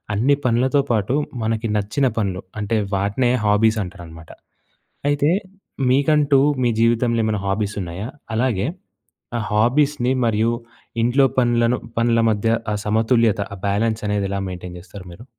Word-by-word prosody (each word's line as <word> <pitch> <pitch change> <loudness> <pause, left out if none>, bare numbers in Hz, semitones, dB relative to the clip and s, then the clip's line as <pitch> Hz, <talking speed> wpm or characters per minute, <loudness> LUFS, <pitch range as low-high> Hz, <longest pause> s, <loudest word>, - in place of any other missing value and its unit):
అన్ని 135 +7 +3
పనులతో 130 +4 +2
పాటు 110 +2 0 0.3
మనకి 110 0 -1
నచ్చిన 105 +7 0
పనులు 95 -4 -1 0.2
అంటే, 110 +2 0 0.2
వాటినే 105 +6 +1
హాబీసంటారనమాట. 100 -7 -1 0.8
అయితే, 145 +2 +2 0.6
మీకంటూ 145 0 +3 0.2
మీ 120 - +3
జీవితంలో 115 0 +2
ఏమన్నా 105 -2 -1
హాబీసున్నాయా? 100 0 -3 0.3
అలాగే, 115 -5 +1 0.7
ఆ - - -2
హాబీస్‍ని 125 +4 +2
మరియు 115 +1 +1 0.5
ఇంట్లో 125 +4 +3
పనులను 120 0 +3 0.2
పనుల 115 0 +3
మధ్య 110 +1 0 0.2
ఆ - - 0
సమతుల్యత, 110 0 +2
ఆ - - -9
బ్యాలెన్సనేది 105 -1 0
ఎలా 100 - -2
మెయింటెయిన్ 90 0 -8
జేస్తారు 95 +2 -11
మీరు? 110 +8 -12
110 Hz, 120 wpm, -21 LUFS, 100-120 Hz, 0.8 s, అన్ని